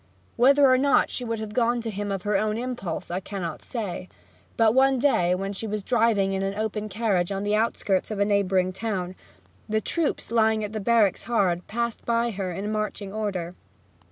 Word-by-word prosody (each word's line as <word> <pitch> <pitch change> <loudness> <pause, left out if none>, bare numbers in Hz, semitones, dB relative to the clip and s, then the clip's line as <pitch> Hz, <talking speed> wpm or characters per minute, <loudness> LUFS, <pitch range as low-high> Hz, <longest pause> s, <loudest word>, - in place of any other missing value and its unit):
Whether 275 +4 +5
or 255 0 +5
not 280 +1 +3
she 250 - -3
would 230 -1 -2
have 215 -1 -6
gone 240 +1 +2
to 225 -1 -4
him 205 0 -4
of 195 -2 -3
her 210 0 0
own 215 +2 +1
impulse 235 -10 -4
I 180 - -1
cannot 185 -5 -5
say; 200 -6 -5 0.5
but 225 -1 +4
one 265 +1 +4
day, 180 -10 +2
when 195 +2 -3
she 220 +3 -4
was 210 -1 -3
driving 220 -5 +2
in 190 - -1
an 195 0 -2
open 215 0 -3
carriage 200 -4 0
in 195 0 -2
the 205 0 0
outskirts 210 -3 0
of 215 - -4
a 200 - +2
neighbouring 190 -2 +1
town, 190 -3 -3 0.6
the 220 0 +2
troops 305 - -2
lying 220 -1 +3
at 210 0 -5
the 215 - -2
barracks 215 -2 +3
hard 185 -7 +1
by - - -17
passed 235 0 -2
her 230 -5 0
in 200 +4 -4
marching 210 -2 -3
order. 195 -5 -3
210 Hz, 200 wpm, -25 LUFS, 195-230 Hz, 0.6 s, Whether